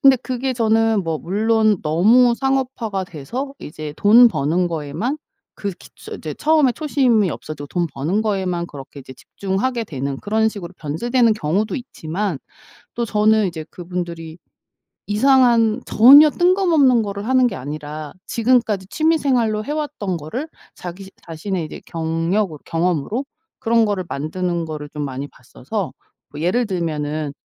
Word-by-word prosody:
근데 270 -1 +7
그게 255 +1 -3
저는 225 -3 +2
뭐 165 -1 -1
물론 215 +2 +1
너무 225 +11 +4
상업화가 260 -7 -1
돼서 245 - -6
이제 150 -1 -8
돈 235 +4 +7
버는 170 +2 0
거에만 165 - -3 0.4
그렇게 200 -3 -6
처 - - -9
이제 - - -6
처음에 305 -5 +3
초심이 250 - +2
없어지고 145 -2 -7
돈 175 -1 -1
버는 170 +10 0
거에만 185 -5 -1
그렇게 140 -1 -10
이제 130 0 -11
집중하게 220 - -3
되는 140 -4 -4
그런 220 +1 +1
식으로 185 -4 -8
변질되는 230 - +1
경우도 200 +4 -1
있지만 190 - -4 0.6
또 235 - -1
저는 215 0 +3
이제 160 -3 -5
그분들이 170 -2 -6 0.7
이상한 235 0 +4
전혀 280 +7 +8
뜬금없는 340 - +3
거를 200 +1 -5
하는 255 -1 +4
게 - - -6
아니라 150 +2 -6
지금까지 230 -5 +1
취미생활로 255 -7 +1
해왔던 290 - -3
거를 235 - -5 0.3
자기 185 +2 -9 0.2
자신의 170 +2 -4
이제 155 - -8
경력을 165 +2 -1
경험으로 175 - -1 0.3
그런 230 -2 +3
거를 200 -3 -1
만드는 170 +3 -2
거를 150 -2 -6
좀 150 0 -6
많이 135 +1 -5
봤어서 155 - -6 0.4
뭐 145 - -8
예를 215 +8 +1
들면은 155 -5 -3
200 Hz, 325 characters per minute, -20 LUFS, 160-240 Hz, 0.7 s, 전혀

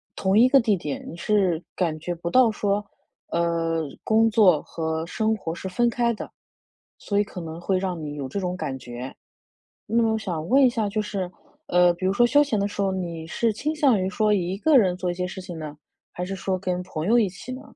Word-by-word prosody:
同 195 +2 +2
一 250 - +7
个 275 - +6
地 215 -4 +2
点。 150 -4 -5
你 170 - -9
是 185 -4 +1
感 165 -4 0
觉 175 +2 -4
不 170 +1 -4
到 255 0 +5
说， 205 0 -1 0.4
呃， 165 -1 0 0.2
工 225 +1 +4
作 190 -8 +5
和 160 0 -3
生 220 +5 0
活 165 -5 -5
是 190 - -6
分 240 +6 +2
开 235 0 +1
的， - - -8 0.7
所 205 -1 -1
以 - - +4
可 185 -2 -8
能 165 0 -7
会 190 +1 +1
让 180 -4 -3
你 150 -1 -5
有 135 -2 -5
这 200 - -3
种 180 -1 -2
感 140 -6 -3
觉。 125 +2 -7 0.7
那 230 +2 +2
么 225 -1 +2
我 - - 0
想 170 -6 -4
问 270 +3 +5
一 255 - +7
下 220 -4 -1
就 215 +2 -1
是， 195 -4 -4 0.4
呃， 180 0 +4
比 185 +2 -7
如 190 - +2
说 240 +4 +4
休 290 +4 +5
闲 255 -8 0
的 200 - +1
时 200 0 -3
候， 195 - +1
你 170 -3 -4
是 225 +6 0
倾 290 +9 -2
向 270 -9 +3
于 185 - 0
说 215 -1 +2
一 185 0 -1
个 305 +4 +4
人 185 -6 +2
做 180 -1 -2
一 - - -3
些 180 0 -3
事 185 +1 -7
情 175 -2 -8
呢， 150 -1 -7 0.4
还 180 - -4
是 195 +1 -4
说 185 -1 -2
跟 180 -1 -2
朋 160 -2 -5
友 235 +3 +4
一 215 - +3
起 200 +7 -9
呢？ 260 +2 -7
190 Hz, 255 characters per minute, -24 LUFS, 170-220 Hz, 0.7 s, 一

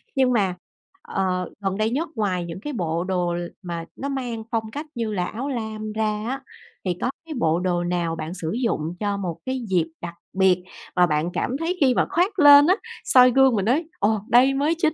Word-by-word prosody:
Nhưng 260 -2 +3
mà, 195 -6 +1 0.5
ờ, 185 -1 -2
gần 195 -1 -2
đây 215 +1 +1
nhất 295 +8 -2
ngoài 185 -5 -1
những 170 +2 -7
cái 295 +8 -5
bộ 170 -6 -1
đồ 180 -2 -1
l 175 0 -3
mà 170 -2 -5
nó 280 - -4
mang 245 -5 -3
phong 220 -1 -2
cách 290 +6 -5
như 230 -2 -2
là 180 -3 0
áo 255 +9 -4
lam 220 -3 -4
ra 215 -1 -1
á 265 +2 -3 0.4
thì 180 -2 -1
có - - +1 0.2
cái 325 - -6
bộ 165 -4 +2
đồ 180 -1 0
nào 175 -2 -1
bạn 160 +1 -5
sử 165 -3 -4
dụng 205 -9 -1
cho 205 -1 -1
một 180 -5 -4
cái 260 0 -2
dịp 175 -4 +2 0.2
đặc 170 -1 -5 0.2
biệt 190 -1 +3 0.3
mà 180 -1 +5
bạn 155 +1 0
cảm 255 - -1
thấy 340 +3 -1
khi 260 -3 +4
mà - - +3
khoác 375 +4 +1
lên 290 -1 +9
á, 370 - +5 0.3
soi 250 -1 +6
gương 265 -2 +5
mà 200 - +1
nói: 260 - +1
"Ồ, 210 +1 +2
đây 255 +3 +5
mới 290 +4 +1
chính 315 -2 +2
215 Hz, 220 wpm, -23 LUFS, 180-260 Hz, 0.5 s, lên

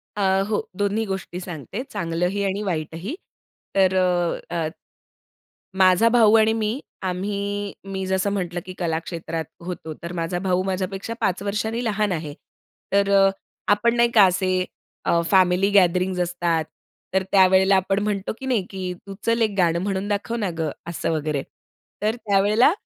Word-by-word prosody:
अ, 205 - -2 0.3
हो. 215 - +1 0.2
दोन्ही 205 +2 0
गोष्टी 190 -2 -4
सांगते, 180 - -6
चांगलंही 180 +4 -1
आणि 195 +2 -1
वाईटही. 170 - -3 0.6
तर 190 -1 +4
अ, 175 -2 0
अ, 160 -2 0 1.1
माझा 185 +4 +6
भाऊ 225 -2 +5
आणि 220 0 +4
मी 225 +4 -1 0.2
आम्ही 200 +2 -2 0.2
मी 190 0 -2
जसं 190 +1 +1
म्हटलं, 175 -3 -2
की 185 - -6
कला 165 -3 0
क्षेत्रात 165 -1 -5 0.2
होतो. 165 -3 -5
तर 170 +1 -5
माझा 170 +1 -2
भाऊ 185 -1 +1
माझ्यापेक्षा 190 +3 -3
5 185 +1 0
वर्षांनी 220 +4 -2
लहान 210 -2 0
आहे. 155 -3 -4 0.6
तर 200 0 +3
अ, 195 -1 +6 0.4
आपण 230 +3 +2
नाही 235 0 +4
का 210 -4 +7
असे 185 0 +1 0.4
अ, 170 - +3
फॅमिली 185 +1 +4
गॅदरिंग्ज 185 -1 +3
असतात, 170 -2 0 0.5
तर 190 - +3
त्यावेळेला 190 0 +6
आपण 195 +1 +1
म्हणतो 205 -2 -1
की 265 - -7
नाही, 240 -7 +1
की 185 -2 -4
"तू 195 - -7
चल 230 0 +2
एक 210 -2 +1
गाणं 170 -2 +3
म्हणून 195 0 -2
दाखव 210 +3 -1
ना 205 -5 -1
गं." 160 -2 0 0.2
असं 170 -3 -2
वगैरे. 150 -3 -1 0.6
तर 215 +2 +2
त्यावेळेला 210 +4 +3
190 Hz, 160 wpm, -23 LUFS, 175-205 Hz, 1.1 s, का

